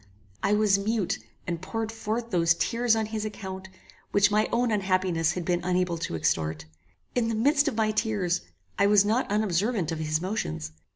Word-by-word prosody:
I 200 Hz, -, +2 dB
was 210 Hz, -2 st, +3 dB
mute, 210 Hz, -2 st, -1 dB, 0.3 s
and 170 Hz, -1 st, -3 dB
poured 225 Hz, +3 st, -3 dB
forth 225 Hz, +1 st, -3 dB
those 165 Hz, -2 st, +3 dB
tears 230 Hz, +4 st, +1 dB
on 220 Hz, -1 st, 0 dB
his 215 Hz, 0 st, -4 dB
account, 190 Hz, -3 st, -6 dB, 0.4 s
which 205 Hz, +1 st, +4 dB
my 215 Hz, +1 st, +2 dB
own 240 Hz, 0 st, +1 dB
unhappiness 185 Hz, -5 st, +1 dB
had 180 Hz, -2 st, -4 dB
been 175 Hz, 0 st, 0 dB
unable 180 Hz, -1 st, 0 dB
to 165 Hz, -, -3 dB
extort. 80 Hz, 0 st, -1 dB, 0.5 s
In 240 Hz, -2 st, +1 dB
the 225 Hz, -, -1 dB
midst 285 Hz, +6 st, +3 dB
of -, -, 0 dB
my 215 Hz, -1 st, +2 dB
tears, 205 Hz, -5 st, 0 dB, 0.4 s
I 200 Hz, -, +5 dB
was 205 Hz, -1 st, +5 dB
not 225 Hz, +5 st, +1 dB
unobservant 205 Hz, -2 st, 0 dB
of 160 Hz, -, -3 dB
his 155 Hz, 0 st, 0 dB
motions. 80 Hz, -, -3 dB
200 Hz, 180 wpm, -27 LUFS, 175-220 Hz, 0.5 s, I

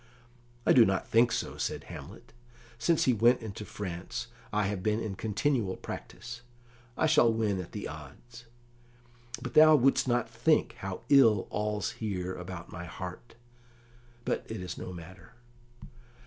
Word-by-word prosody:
"I -, -, +6 dB
do 125 Hz, -, +8 dB
not 95 Hz, -3 st, 0 dB
think 115 Hz, +1 st, +4 dB
so," -, -, -3 dB
said -, -, -3 dB
Hamlet. -, -, -11 dB, 0.5 s
"Since 165 Hz, +6 st, +3 dB
he 130 Hz, -, +4 dB
went 120 Hz, +3 st, +4 dB
into 105 Hz, -1 st, -6 dB
France 90 Hz, -5 st, -5 dB, 0.2 s
I 105 Hz, 0 st, +1 dB
have 100 Hz, -1 st, -2 dB
been 105 Hz, +3 st, +1 dB
in 110 Hz, -3 st, -3 dB
continual 110 Hz, 0 st, 0 dB
practice. 120 Hz, 0 st, -8 dB, 0.6 s
I -, -, +2 dB
shall 150 Hz, -7 st, +5 dB
win 105 Hz, -4 st, 0 dB
at 85 Hz, -, -10 dB
the -, -, -5 dB
odds. 80 Hz, -, -11 dB, 1.0 s
But -, -, -5 dB
thou 155 Hz, 0 st, +8 dB
wouldst 135 Hz, 0 st, +3 dB
not 120 Hz, -1 st, +1 dB
think -, -, +2 dB
how 95 Hz, -1 st, -5 dB
ill 115 Hz, -8 st, +6 dB
all's 105 Hz, -1 st, -1 dB
here 95 Hz, -4 st, -2 dB
about 90 Hz, -1 st, -8 dB
my 85 Hz, -, -7 dB
heart; 90 Hz, +7 st, -8 dB, 0.9 s
but -, -, -1 dB
it 110 Hz, -, -4 dB
is 90 Hz, -1 st, -5 dB
no -, -, -7 dB
matter." 90 Hz, +4 st, -11 dB
105 Hz, 150 wpm, -30 LUFS, 95-120 Hz, 1.0 s, do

